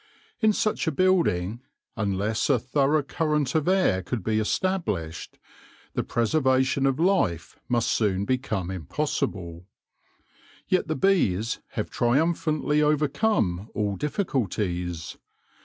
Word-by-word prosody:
In 220 -1 +4
such 215 -3 0
a - - +3
building, 135 - +1 0.3
unless 105 +2 -1
a 135 - +5
through 140 +5 +1
current 150 -2 -1
of 155 -1 +1
air 185 - +3
could 105 +3 -4
be 110 +1 +1
established, 105 - -2 0.6
the - - -1
preservation 130 +2 +2
of 135 +2 0
life 170 - +1
must 120 -1 +1
soon 100 -3 +1
become 110 -7 -1
impossible. 95 - -3 1.0
Yet 185 -3 +1
the 155 - -1
bees 115 - +1
have - - -3
triumphantly 150 +3 +1
overcome 150 - +1
all 100 -1 0
difficulties. 95 - -2
130 Hz, 110 wpm, -26 LUFS, 100-155 Hz, 1.0 s, a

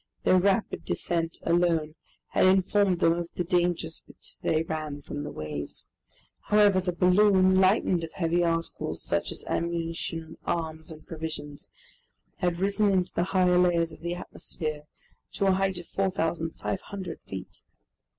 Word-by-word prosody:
Their 185 - +5
rapid 200 +3 +1
descent 165 -1 -1
alone 165 -2 +2 0.4
had - - +4
informed 190 -1 +3
them 165 - +5
of 170 0 -3
the 180 - 0
dangers 175 -2 0
which - - -7
they 155 0 +1
ran 155 -3 -4
from 145 - -5
the 145 - -5
waves. 75 -2 -5 0.6
However, 205 -2 +5
the 180 0 -1
balloon, 185 +1 +4
lightened 185 -3 +3
of 160 - -5
heavy 170 0 +1
articles, 165 -1 -2
such - - 0
as - - -6
ammunition, 165 -1 -3
arms, 160 -1 -3
and 155 -1 -11
provisions, 155 -3 -6 0.7
had 175 -1 0
risen 200 +3 +2
into 185 -2 +1
the 175 - +1
higher 180 -1 +3
layers 170 -2 +3
of - - -12
the 170 +1 -2
atmosphere, 155 -4 -5 0.5
to 200 - 0
a 195 - +5
height 190 0 +1
of 175 - -7
4,500 170 - -2
feet. 95 -1 -7
170 Hz, 145 wpm, -27 LUFS, 160-185 Hz, 0.7 s, Their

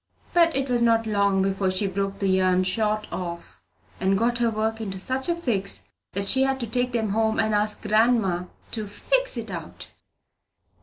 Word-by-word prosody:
But 335 -2 +4
it 270 0 0
was 245 -2 +1
not 230 -1 +3
long 200 -2 +2
before 195 0 0
she 185 +3 +1
broke 195 +1 -2
the 195 - -1
yarn 185 -1 +3
short 215 +2 0
off, 170 -2 -6 0.4
and 190 +1 +2
got 235 +3 +1
her 235 -1 +2
work 220 +1 -2
into 195 -3 -4
such 260 - -1
a 340 - +2
fix 220 - -2 0.3
that 200 +1 +1
she 265 +6 +5
had 270 0 +1
to - - -1
take 245 +2 -1
it 220 -3 0
home 220 +1 +1
and 220 -1 +1
ask 210 0 0
grandma 215 -4 +2 0.3
to 215 -3 -3
"fix - - -1
it - - -5
out." - - -8
215 Hz, 190 wpm, -24 LUFS, 195-235 Hz, 0.4 s, she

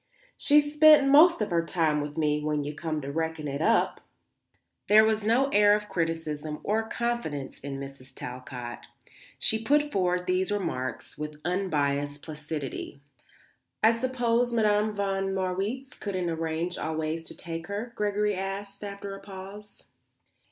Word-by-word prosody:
She's 295 0 +4
spent 300 -2 +7
most 310 +2 +7
of 205 - -5
her 170 -1 +2
time 160 -3 +1
with 145 +1 -6
me, 150 -1 +1
when 150 -1 0
you 145 +1 -4
come 155 0 -3
to 140 0 -5
reckon 160 0 -2
it 140 +1 -3
up." 230 +7 +2 0.9
There 215 +1 +7
was 220 -1 +1
no 240 +6 +3
air 205 -3 +5
of 210 0 -4
criticism 160 -4 -2
or 220 +2 0
confidence 235 - -3
in 135 0 -6
Mrs. 135 -1 -9
Talcott. 125 -1 -7 0.5
She 220 0 +1
put 295 +4 +2
forward 180 -2 +1
these 185 +2 +1
remarks 130 -14 -3
with 150 0 -6
unbiassed 145 -6 -1
placidity. 150 -2 -6 0.8
"I 220 - +7
suppose 240 0 +1
Madame 215 -2 +2
von 195 -1 -1
Marwitz 195 +9 -2
couldn't 185 -4 -3
arrange 165 +2 -2
always 160 +1 -2
to - - -7
take 165 0 -6
her?" 210 +4 -4
Gregory 210 -1 0
asked 195 +1 -5
after 200 0 -6
a 195 - -8
pause. 195 +1 -11
190 Hz, 145 wpm, -28 LUFS, 150-215 Hz, 0.9 s, spent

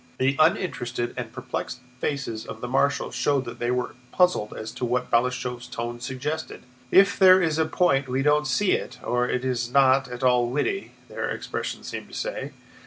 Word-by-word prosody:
The 135 +1 +2
uninterested 155 - +1
and - - -5
perplexed - - -5 0.2
faces 130 -7 -3
of 110 - -7
the 125 - -5
marshals 140 +3 +1
showed 140 -2 +1
that 120 0 -8
they 120 - -1
were 125 0 -1 0.2
puzzled 180 - +2
as 110 0 -6
to - - -8
what 125 +1 -1
Balashëv's 125 0 0
tone 120 +1 -5
suggested. 140 +5 -4 0.3
"If 195 +1 +5
there 185 -1 +8
is 160 -3 +1
a 160 - +3
point 140 -5 +2
we 130 +2 0
don't 150 +1 +3
see 205 +4 +2
it, 125 - -1
or 125 0 0
it 125 +1 -1
is 120 -2 -1
not 135 0 +4
at 125 +1 -7
all 125 -1 +4
witty," 150 - -2
their - - -4
expressions - - -4
seemed - - -6
to - - -11
say. - - -4
130 Hz, 185 wpm, -25 LUFS, 125-150 Hz, 0.3 s, there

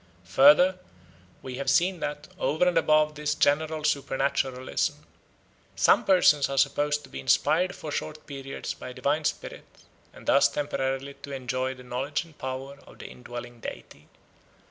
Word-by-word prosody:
Further, 155 - +6 0.6
we 130 -1 -6
have 140 - -2
seen 180 +1 +2
that, 150 -1 -5
over 160 +5 +1
and 180 - +1
above 155 0 +3
this 150 0 -2
general 155 +2 +1
supernaturalism, 135 -2 -1 0.7
some - - +4
persons 165 -7 +4
are 135 - -3
supposed 145 +2 +1
to - - -14
be 65 - -7
inspired 180 - +2
for 155 - -7
short 155 +1 -5
periods 135 -1 -6
by 125 - -9
a - - -8
divine 145 +4 0
spirit, - - -3 0.5
and - - -15
thus - - +5
temporarily 135 -1 -3
to 140 - -8
enjoy 130 0 -2
the 125 - -13
knowledge 130 +5 -3
and 160 -2 -19
power 130 +2 -6
of - - -15
the - - -9
indwelling 120 -1 -9
deity. - - -9
140 Hz, 155 wpm, -27 LUFS, 130-155 Hz, 0.7 s, Further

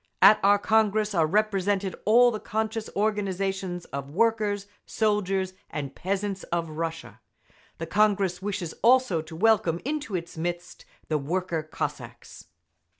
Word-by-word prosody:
At 215 - +7
our 200 +1 +5
Congress 215 0 +2
are 165 -4 +3
represented 200 0 0
all 240 +3 +6
the 215 - -4
conscious 220 +1 -3
organisations 195 -3 -1
of 140 0 -6
workers, 210 +2 +1 0.2
soldiers 195 -3 0 0.2
and 140 -3 -5
peasants 195 +2 -3
of 170 -2 -2
Russia. 160 -8 -5 0.6
The 165 - -4
Congress 200 -2 +1
wishes 195 -4 -3
also 245 -8 +4
to 160 +1 -11
welcome 205 -3 +2
into 295 -7 -3
its 170 -2 -5
midst 175 +1 -5 0.2
the 155 -1 0
worker 170 +3 -2
Cossacks. 155 - -7
195 Hz, 130 wpm, -26 LUFS, 170-215 Hz, 0.6 s, At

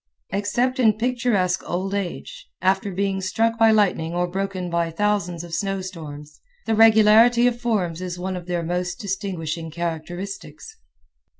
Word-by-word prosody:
Except 240 +6 0
in 220 -4 +5
picturesque 225 -5 0
old 190 +3 -2
age, 200 -4 -5
after 190 +2 +1
being 195 +1 -1
struck 225 +5 0
by 225 0 +6
lightning 185 -6 +2
or 180 0 +1
broken 190 0 -3
by 170 -1 0
thousands 180 -1 -1
of 170 -1 -10
snow 195 +1 -1
storms, 150 -5 -9 0.2
the 225 - 0
regularity 225 +2 +6
of 240 -1 +1
forms 185 -8 -1
is 180 -1 -4
one 185 +1 -3
of 180 -1 -7
their 175 -1 -1
most 180 +1 -2
distinguishing 180 -5 -4
characteristics. 175 - -6
190 Hz, 145 wpm, -23 LUFS, 175-215 Hz, 0.2 s, by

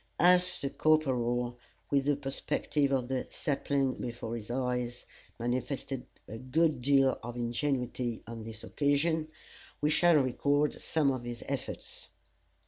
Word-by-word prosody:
As 180 +1 +5
the 140 - -2
corporal, 125 -6 +1 0.3
with 140 -1 +3
the 145 0 +3
perspective 140 +1 -1
of 130 -2 +1
the 130 -1 -2
saplings 140 -2 -1
before 120 -1 -4
his 110 -2 -7
eyes, 125 -1 -2 0.3
manifested 125 +2 -2 0.2
a 110 - -7
good 145 +2 +1
deal 135 0 +4
of 120 0 -6
ingenuity 120 0 -1
on 115 -1 -7
this 110 0 -8
occasion, 155 +2 +1 0.5
we 150 +1 +2
shall 175 +1 +5
record 145 +2 +2
some 150 -4 +2
of 130 -2 -3
his 120 -1 -6
efforts. - - -5
130 Hz, 135 wpm, -31 LUFS, 120-145 Hz, 0.5 s, As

